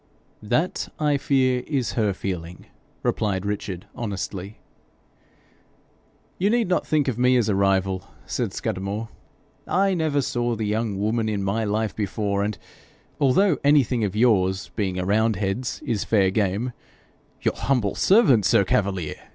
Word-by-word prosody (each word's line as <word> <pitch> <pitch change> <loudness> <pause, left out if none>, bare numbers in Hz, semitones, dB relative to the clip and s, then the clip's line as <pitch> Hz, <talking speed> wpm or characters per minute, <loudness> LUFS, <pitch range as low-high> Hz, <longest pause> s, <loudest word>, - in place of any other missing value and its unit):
'That, 155 +12 -1
I 150 -2 +2
fear, 130 -2 +2
is 135 -5 -1
her 110 -3 +1
feeling,' 90 -2 -5 0.4
replied 100 -2 0
Richard, 100 -3 -4
honestly. 100 -3 -5 1.8
'You 195 +3 +2
need 235 -1 +2
not 180 - 0
think 150 -3 +1
of 125 -3 -1
me 125 0 +4
as 115 -3 +2
a - - +2
rival,' 95 -1 +1 0.2
said - - -2
Scudamore. 100 +4 -3 0.6
'I 195 +1 +2
never 155 -5 +1
saw 120 -1 -1
the 110 -1 -3
young 105 -1 -1
woman 110 +2 0
in 100 -2 -2
my 100 +4 0
life 105 -1 -1
before, 100 -1 -1
and 105 0 -2 0.6
although 155 +6 +3
anything 135 -5 +3
of 100 -1 -2
yours, 95 -5 +2
being 95 -4 -1
a 90 - -2
roundhead's, 105 +2 0
is 110 -4 -1
fair 100 -4 +2
game 105 +4 0 0.3
' - - -36
'Your - - +2
humble 125 -7 0
servant, 185 - +4
sir 100 - +4
Cavalier!' 95 -5 -1
110 Hz, 145 wpm, -24 LUFS, 100-125 Hz, 1.8 s, me